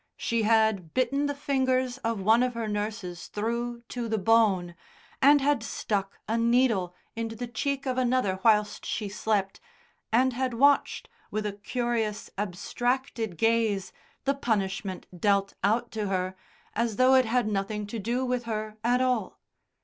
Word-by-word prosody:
She 230 -1 0
had 220 -6 +2
bitten 275 +3 +1
the 285 - -2
fingers 260 -2 0
of 230 -4 -2
one 220 +4 +5
of 250 -1 0
her 230 -1 -2
nurses 205 -4 -4
through 235 +3 -3
to 240 -2 -4
the 220 - +1
bone, 195 -4 +3 0.5
and 285 +1 +6
had 285 -3 +2
stuck 200 -3 -3
a 225 +2 0
needle 230 -7 +2 0.2
into 225 0 -4
the 245 +2 -4
cheek 275 +4 -2
of 260 -1 0
another 245 -7 +1
whilst 210 -2 +3
she 210 - -3
slept, 200 -1 -1 0.5
and 255 +3 +3
had 255 0 -1
watched, 280 +4 +3 0.2
with 215 0 -3
a 205 - -2
curious 225 0 -2
abstracted 225 +2 -2
gaze, 225 -3 +1 0.3
the 275 - +3
punishment 200 -7 -2
dealt 200 +2 +1
out 230 +4 +1
to 215 -2 -2
her, 185 -1 -1 0.4
as 230 -1 0
though 255 +3 +5
it 260 -1 +6
had 235 0 +1
nothing 210 +1 -2
to 220 +3 -5
do 240 +5 -1
with 250 -1 -1
her 215 -1 -4
at 245 +2 +3
all. 250 -6 0
225 Hz, 155 wpm, -27 LUFS, 205-250 Hz, 0.5 s, and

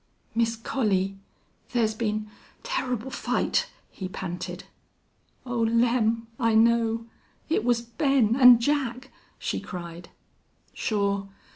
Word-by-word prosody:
"Miss 230 0 +1
Collie, 200 -5 0 0.5
thar's 225 -3 +1
been 215 -1 -2 0.4
turrible 265 - -2
fight!" - - 0 0.2
he 190 - -6
panted. 180 -2 -5 0.8
"Oh, 245 -2 -2
Lem!... 230 0 +2
I 230 -2 +2
know. 230 0 +3 0.4
It 310 - +1
was 235 -1 +2
Ben 235 -1 +2
and 250 -3 +8
Jack," 265 -1 -1 0.3
she - - -2
cried. 170 -1 -8 0.6
"Shore. 200 -2 -1
230 Hz, 105 wpm, -26 LUFS, 215-245 Hz, 0.8 s, and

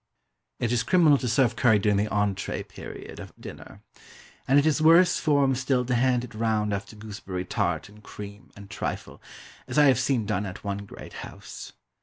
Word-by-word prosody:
It 120 - 0
is 120 -2 +2
criminal 160 -5 +4
to 125 - -3
serve 120 -1 +2
curry 115 -2 +4
during 105 0 +2
the 105 +1 0
entrée 105 -2 -1
period - - -10
of - - -9
dinner. - - -11 0.6
And 135 - +4
it 145 - +4
is 155 0 +2
worse 170 +3 +6
form 140 -3 +3
still 130 -1 0
to 125 - -1
hand 125 0 +2
it 125 -2 -9
round 110 -2 0
after 100 +2 -5
gooseberry 100 -4 -6
tart 85 -3 -1
and 105 +1 -17
cream, 100 -1 -10
and 100 -1 -11
trifle, - - -5 0.5
as - - -4
I 150 - +7
have 130 -3 +5
seen 125 -4 +1
done 105 -1 -1
at 90 - -9
one 100 0 -4
great - - -11
house. - - -10
115 Hz, 190 wpm, -26 LUFS, 105-135 Hz, 0.6 s, I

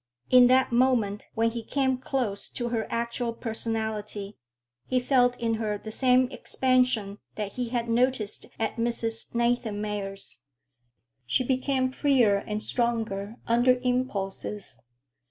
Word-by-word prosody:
In 250 -1 +8
that 260 +1 +4
moment 235 -5 +2
when 230 +1 +2
he 235 0 -4
came 265 0 0
close 250 -6 -2
to 240 -1 -3
her 230 -2 -1
actual 235 0 -2
personality, 220 -3 -4 0.5
he 255 - +2
felt 245 -1 +3
in 230 -1 0
her 210 -1 -1
the 220 +2 -8
same 255 +2 +4
expansion 250 -6 +1 0.2
that 210 -2 -3
he 245 +1 -3
had 235 -1 -1
noticed 235 -2 0
at 225 +1 -2
Mrs. 230 -1 -2
Nathanmeyer's. 210 - -1 0.9
She 125 - +2
became 260 0 0
freer 260 -7 +3
and 210 +1 -4
stronger 225 -4 -1
under 245 +2 +4
impulses. 210 - -2
235 Hz, 125 wpm, -27 LUFS, 210-250 Hz, 0.9 s, In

